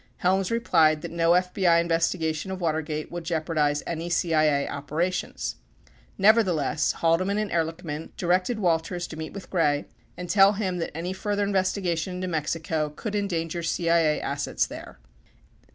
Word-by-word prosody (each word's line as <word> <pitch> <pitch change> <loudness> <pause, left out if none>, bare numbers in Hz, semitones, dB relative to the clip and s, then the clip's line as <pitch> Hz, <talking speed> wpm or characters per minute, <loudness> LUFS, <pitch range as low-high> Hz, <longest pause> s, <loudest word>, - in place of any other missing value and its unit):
Helms 190 +1 +1
replied 165 -10 +3
that - - -5
no 170 0 +3
FBI 180 -1 +3
investigation 165 0 0
of 190 -1 -4
Watergate 155 -2 -2
would 175 0 -5
jeopar 165 -1 -2
dize 145 -2 +1
anv 170 +1 -4
CIA 155 -4 +2
operations. 165 +6 -3 0.6
Nevertheless, 190 - +3
Haldeman 185 +5 +1
and 215 -2 -2
Ehrlichman 165 -2 -3
directed 185 +6 +1
Walters 175 -2 0
to - - -9
meet 160 0 -6
with 200 - -9
Gray 150 -5 +1 0.3
and 180 - -6
tell 195 +3 +6
him 190 -4 -2
that 165 -2 -4
any 175 +3 -3
further 205 +1 -1
investigation 185 -3 0
into 185 0 -3
Mexico 160 -1 -1
could 200 +8 -6
endanger 175 -5 -2
CIA 165 -1 +2
assets - - -1
there. - - -10
170 Hz, 145 wpm, -26 LUFS, 160-185 Hz, 0.6 s, tell